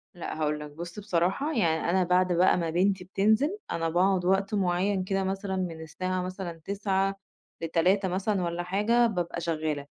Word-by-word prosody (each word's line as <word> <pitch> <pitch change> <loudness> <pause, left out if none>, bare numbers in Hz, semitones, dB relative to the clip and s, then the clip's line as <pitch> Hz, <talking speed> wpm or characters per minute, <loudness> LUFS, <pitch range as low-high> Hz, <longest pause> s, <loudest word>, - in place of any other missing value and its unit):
لأ، 170 - -5
هاقول 150 0 0
لَك، 150 -1 -8
بُص 170 +5 -7
بصراحة 195 - 0
يعني 165 -6 +1
أنا 185 +1 +3
بعد 180 0 +2
بقى 180 +2 +4
ما 165 -2 -1
بنتي 185 +2 +1
بتنزل، 220 - +2
أنا 165 -1 -1
باقعد 180 +1 +2
وقت 195 +2 +1
معين 190 0 +1
كده، 195 0 -1
مثلًا 195 0 -2
من 170 -3 -3
الساعة 185 +3 -3
مثلًا 180 -3 -6
09:00 195 -1 0 0.5
ل15:00 180 +4 +2
مثلًا 190 +1 0
والّا 170 +1 -2
حاجة، 215 +6 +2
بابقى 175 -4 -3
شغّالة. 155 -3 -2
185 Hz, 170 wpm, -28 LUFS, 170-195 Hz, 0.5 s, بقى